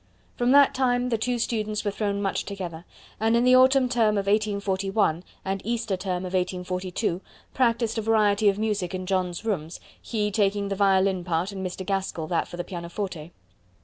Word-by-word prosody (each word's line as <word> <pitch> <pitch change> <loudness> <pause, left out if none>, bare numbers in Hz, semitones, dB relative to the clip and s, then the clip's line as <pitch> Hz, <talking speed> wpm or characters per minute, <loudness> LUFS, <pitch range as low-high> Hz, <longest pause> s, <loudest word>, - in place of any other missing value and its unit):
From 245 0 +1
that 280 0 +6
time 250 -2 +1
the 230 - +1
two 245 +2 0
students 215 -2 -2
were 205 - +1
thrown 200 -1 -2
much 195 - -1
together, 180 -4 -6 0.3
and 225 +2 +3
in 235 - +3
the 255 0 +6
autumn 260 0 +5
term 225 -4 +2
of 200 - -1
1841 200 -3 0 0.2
and 195 0 -2
Easter 230 -2 -1
term 185 -1 -3
of 185 - -6
1842 180 +1 -2 0.3
practised 230 -3 +1
a - - -1
variety 210 -1 +3
of 200 - -1
music 210 -4 -1
in 185 0 -4
John's 185 0 -1
rooms, 170 -7 -3 0.2
he 210 -3 -2
taking 200 -1 +1
the 195 - -1
violin 190 -2 +2
part 175 +2 -1
and 190 -1 -6
Mr. 185 0 -5
Gaskell 195 -4 -2
that 170 - 0
for 175 - -9
the 175 - -2
pianoforte. 175 -2 -6
200 Hz, 180 wpm, -25 LUFS, 185-225 Hz, 0.3 s, that